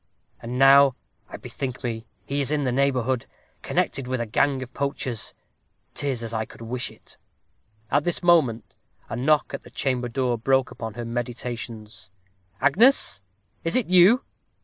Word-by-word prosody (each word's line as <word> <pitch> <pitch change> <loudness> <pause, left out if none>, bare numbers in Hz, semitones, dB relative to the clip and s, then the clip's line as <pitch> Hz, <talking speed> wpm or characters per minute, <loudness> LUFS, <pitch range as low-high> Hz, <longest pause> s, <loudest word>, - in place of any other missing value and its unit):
And 120 +2 -5
now, 135 0 +7 0.3
I - - -7
bethink 130 -2 -6
me, 115 -2 -4 0.2
he 140 +1 -1
is 135 - -1
in 150 -1 0
the 130 - 0
neighborhood, 130 -2 0 0.3
connected 135 -2 -1
with 130 0 -1
a 120 - -1
gang 130 +4 +1
of 130 0 -12
poachers 130 -5 -3 0.6
'tis 130 -5 -2
as 115 0 -5
I 110 0 0
could 115 - -12
wish 120 +2 -3
it." - - -18 0.7
At 145 +2 +3
this 175 +1 0
moment 155 -10 +3 0.4
a - - -3
knock 145 +5 +2
at - - -4
the - - -14
chamber 125 -2 -1
door 120 -1 -1
broke 130 +1 +2
upon 110 -2 -7
her 120 - -5
meditations. 115 -4 -5 0.5
"Agnes, 190 - +4 0.4
is 165 - -1
it 250 -7 +1
you?" 185 +8 +6
130 Hz, 160 wpm, -24 LUFS, 115-140 Hz, 0.7 s, now